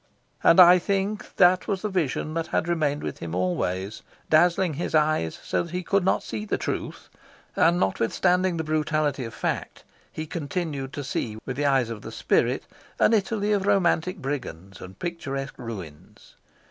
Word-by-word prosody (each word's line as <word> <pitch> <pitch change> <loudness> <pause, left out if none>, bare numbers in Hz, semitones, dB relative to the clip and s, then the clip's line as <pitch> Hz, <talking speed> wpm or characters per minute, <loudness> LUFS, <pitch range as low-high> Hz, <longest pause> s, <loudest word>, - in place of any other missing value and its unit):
And 165 - +6
I 180 0 +9
think 200 +3 -2
that 180 0 +4
was 195 -1 -2
the 215 - -1
vision 155 -4 -1
that 165 0 -2
had 170 - -1
remained 150 -4 0
with - - -5
him 85 0 -5
always, 90 +2 -2 0.3
dazzling 175 +2 +4
his 160 +2 -3
eyes 150 - +1
so - - 0
that 170 0 -7
he 180 0 -2
could 195 +2 +1
not 190 - +1
see 110 -1 -5
the 105 - -1
truth; - - -4 0.5
and 170 +2 +4
notwithstanding 180 - +1
the 160 - -1
brutality 155 -3 0
of 115 - -8
fact, - - -3 0.3
he 155 - -5
continued 145 -3 -4
to 145 - -4
see 115 -5 -3
with 130 - -4
the 145 +2 0
eyes 130 -4 +2
of 110 -2 -6
the - - -8
spirit - - +1 0.3
an - - +4
Italy 210 0 +1
of 200 -1 +1
romantic 185 -2 +2
brigands 120 - -6
and 95 +1 -10
picturesque 135 - -5
ruins. 95 -11 -9
155 Hz, 170 wpm, -25 LUFS, 125-180 Hz, 0.5 s, I